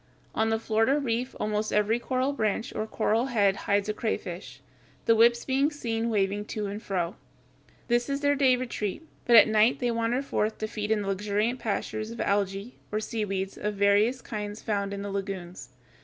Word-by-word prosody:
On 220 0 +1
the 225 - +2
Florida 225 +5 +2
Reef 250 -2 -2
almost 210 0 -1
every 210 +3 +2
coral 260 +3 0
branch 220 -2 -1
or 215 - -3
coral 225 +3 +1
head 205 -6 +3
hides 200 0 0
a 215 - 0
crayfish, 175 - -4 0.5
the 230 - +5
whips 235 +1 +4
being 275 +2 +2
seen 235 -6 -2
waving 205 -1 0
to 210 0 -4
and 205 +2 -5
fro. 180 -5 -2 0.7
This 240 +2 +1
is 280 0 -1
their 285 0 +3
day 270 -3 +4
retreat, 245 +2 -4 0.2
but 240 - +5
at 225 - +9
night 220 +3 +4
they 245 -2 0
wander 230 +3 0
forth 215 -5 -1
to 215 - -3
feed 210 -1 -4
in 215 -2 +1
the - - -5
luxuriant 210 +5 0
pastures 215 0 -3
of 230 - -8
Algæ, 200 +2 -1 0.2
or 210 - 0
seaweeds, 195 -3 -3
of 210 0 -2
various 205 +5 +3
kinds 210 -1 -5
found 200 -2 -1
in 200 0 -4
the 200 - -4
lagoons. 190 -6 -5
215 Hz, 185 wpm, -27 LUFS, 200-235 Hz, 0.7 s, at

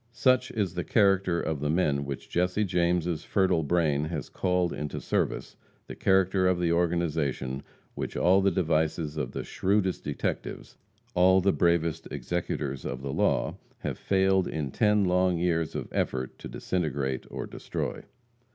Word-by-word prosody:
Such 130 0 +3
is 100 -6 -1
the 90 -1 -2
character 95 -5 +3
of 80 -3 -2
the 75 +1 -1
men 75 -4 +1
which 70 -1 -6
Jesse 90 +4 +1
James' 85 -3 0
fertile 95 -4 +2
brain 75 -2 +1
has 80 -4 -4
called 90 -1 0
into 75 0 -4
service; - - -2 0.3
the - - -8
character 95 0 +3
of 90 -1 +2
the 85 -1 +1
organization, 80 -6 0 0.3
which - - -4
all 95 +3 +4
the 100 - +4
devices 80 -3 0
of 75 -5 -3
the - - -3
shrewdest 95 -1 0
detectives, - - -4 0.4
all 95 +1 +5
the 95 +1 +2
bravest 85 -2 +1
executors 70 -1 -3
of 65 +1 -5
the 70 -1 -3
law - - +1 0.2
have - - -4
failed 95 -1 +2
in 75 -4 -3
ten 105 - +3
long 90 0 +2
years 85 -2 0
of - - -3
effort, 65 0 -2
to - - -7
disintegrate 70 -7 -2
or - - -5
destroy. - - -4
85 Hz, 155 wpm, -28 LUFS, 75-95 Hz, 0.4 s, all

